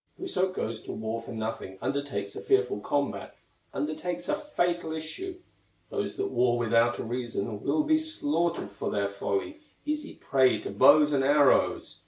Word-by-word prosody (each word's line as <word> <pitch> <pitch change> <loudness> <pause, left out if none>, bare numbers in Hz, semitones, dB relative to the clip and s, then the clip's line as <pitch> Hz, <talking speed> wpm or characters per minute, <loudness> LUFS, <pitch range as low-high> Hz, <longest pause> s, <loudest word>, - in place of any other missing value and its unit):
Whoso 190 - -1
goes 115 -10 -4
to - - -7
war 110 +1 -3
for 115 - -9
nothing, 110 -4 -5
Undertakes 125 -9 -3
a - - -5
fearful 100 +1 +2
combat, 140 +6 -2 0.4
Undertakes 155 +4 -3
a 300 - +1
fatal 175 - -1
issue; 345 - -5 0.5
Those - - -3
that 395 0 -2
war 120 -1 +2
without 115 0 +3
a - - -4
reason 115 -3 -3
Will 305 - +1
be 315 +1 +3
slaughtered 290 - -1
for 100 - -4
their 100 -1 0
folly, 100 - -3 0.3
Easy 300 0 -3
prey 130 -2 +3
to - - -5
bows 150 +8 +6
and 135 -1 +2
arrows. 145 0 +3
140 Hz, 160 wpm, -28 LUFS, 110-180 Hz, 0.5 s, bows